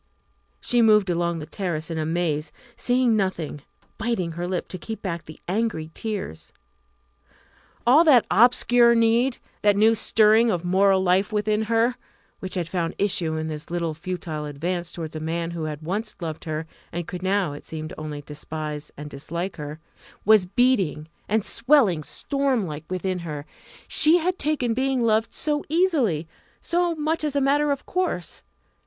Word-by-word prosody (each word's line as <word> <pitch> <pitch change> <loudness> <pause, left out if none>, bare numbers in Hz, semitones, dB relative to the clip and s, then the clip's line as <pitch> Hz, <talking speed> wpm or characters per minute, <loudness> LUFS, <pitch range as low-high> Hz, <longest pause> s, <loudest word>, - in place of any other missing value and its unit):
She 240 -1 +2
moved 210 -4 +5
along 170 0 0
the 155 - -6
terrace 170 -3 -4
in 160 - -2
a 155 - -1
maze, 160 -3 -1 0.2
seeing 245 -2 +2
nothing, 180 -7 -2 0.4
biting 220 -7 -1
her 175 +2 -4
lip 180 -1 -2
to 185 - -6
keep 220 +5 -6
back 170 -4 -4
the 155 - -11
angry 185 -5 -1
tears. 190 - -5 1.3
All 270 +7 +7
that 260 -7 +6
obscure 240 0 +5
need, 230 +3 +3 0.2
that 205 -1 +4
new 220 +2 +5
stirring 220 +1 +4
of 180 -4 -1
moral 190 +1 +3
life 190 +3 +2
within 215 +1 0
her 230 +2 +2 0.4
which 185 0 -5
had 175 -3 -1
found 170 -1 -2
issue 175 -5 0
in 155 0 -2
this 155 -1 -6
little 170 -2 -2
futile 165 -2 -5
advance 170 +4 -3
towards 160 -2 -6
a - - -3
man 165 +2 -2
who 165 -2 -4
had 155 0 -5
once 210 +7 -3
loved 160 -3 -5
her 155 0 -3 0.3
and 175 0 -4
could 180 - -6
now, 190 -4 +1
it 145 - -9
seemed, 155 +1 -6
only 150 -2 -6
despise 150 0 -6
and 150 +1 -7
dislike, 170 +6 -5
her 150 0 -6 0.5
was 210 -3 +5
beating 190 - +1 0.2
and 215 0 +1
swelling 230 - +3
stormlike 220 - -2
within 185 0 -2
her. 150 -4 -6 0.4
She 315 +3 +5
had 360 +2 -1
taken 280 -6 0
being 260 0 0
loved 225 0 +1
so 295 -1 0
easily, 285 - +1 0.3
so 345 0 0
much 310 +1 -1
as 295 -2 -1
a - - +3
matter 290 +2 +2
of 280 -1 -2
course! 355 - -2
185 Hz, 165 wpm, -24 LUFS, 160-235 Hz, 1.3 s, All